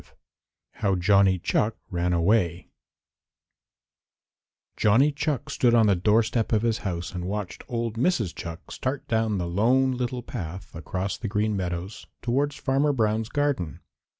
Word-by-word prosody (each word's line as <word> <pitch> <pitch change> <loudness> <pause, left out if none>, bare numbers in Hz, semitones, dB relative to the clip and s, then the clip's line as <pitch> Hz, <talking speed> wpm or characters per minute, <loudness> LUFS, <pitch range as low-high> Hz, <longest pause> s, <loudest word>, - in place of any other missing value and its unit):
V - - -25 0.7
HOW 100 -2 +1
JOHNNY 95 +1 +4
CHUCK 110 +1 +1
RAN 90 0 0
AWAY 85 -1 +1 2.0
Johnny 125 +8 +4
Chuck 145 -1 -2
stood 120 -2 +3
on 115 -1 +5
the 100 -2 +4
doorstep 110 +4 +2
of 110 -1 +2
his 115 -1 +1
house 90 -2 -4
and 90 -1 -4
watched 100 0 -4
old 115 -2 -3
Mrs. 120 - +1
Chuck 85 0 -8
start 130 +2 -3
down 110 -2 +1
the 90 - -2
Lone 125 +9 +3
Little 125 0 -3
Path 90 0 -7
across 90 +4 -4
the 115 - -3
Green 105 +1 0
Meadows 90 +1 -4 0.2
towards 140 +4 0
Farmer 140 +2 +1
Brown's 110 -2 0
garden. 140 - -1
105 Hz, 145 wpm, -26 LUFS, 90-120 Hz, 2.0 s, on